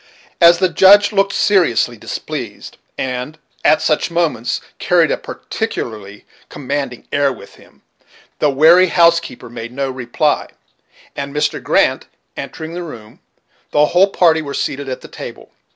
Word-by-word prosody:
As 170 0 +7
the 185 +1 +2
Judge 195 +4 +6
looked 195 -1 +1
seriously 170 - +2
displeased, 110 - -7 0.2
and, 130 +4 -4 0.3
at 155 - +3
such 155 +1 +1
moments, 165 -9 -1 0.2
carried - - +2
a - - +2
particularly 105 -3 -6 0.2
commanding 135 -3 -5
air 140 -1 +2
with 105 -6 -12
him, - - -21 0.6
the 150 - +3
wary 160 +7 +5
housekeeper 170 -6 +2
made 120 0 -8
no 135 +1 -3
reply; 130 +4 -1 0.7
and, 140 +1 -6
Mr. 150 - -1
Grant - - +1 0.3
entering 160 +1 -7
the 175 - -5
room, 115 -10 -10 0.5
the 150 0 +3
whole 180 +6 +3
party 165 -4 +3
were 140 -2 -6
seated 140 0 -3
at 130 - -5
the - - -11
table. - - -10
150 Hz, 140 wpm, -17 LUFS, 125-170 Hz, 0.7 s, As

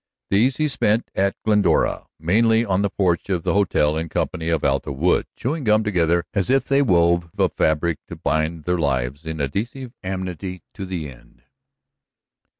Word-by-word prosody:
These 120 +7 +3
he 155 - +1
spent 115 -5 0
at 100 +1 +1
Glendora, 105 -6 +2
mainly 110 +7 +3
on 95 -2 +1
the 100 - +1
porch 90 -2 0
of 90 -4 -1
the - - 0
hotel 85 -6 +2
in 80 +1 -3
company 85 +1 -2
of 80 -1 0
Alta 70 +1 0
Wood, 80 +7 +1
chewing 150 +4 -3
gum 110 -1 +3
together 85 -4 +1
as 100 0 -1
if 135 +1 +3
they 140 +1 +3
wove 85 -7 +3
a - - +3
fabric 80 +1 0
to - - -7
bind 80 +2 -1
their 90 +1 0
lives 70 +1 -1
in 80 0 -4
adhesive 115 - -3
amity 95 -1 -5
to 95 -2 -6
the 85 -5 -4
end. 65 -3 -16
90 Hz, 170 wpm, -22 LUFS, 80-105 Hz, -, These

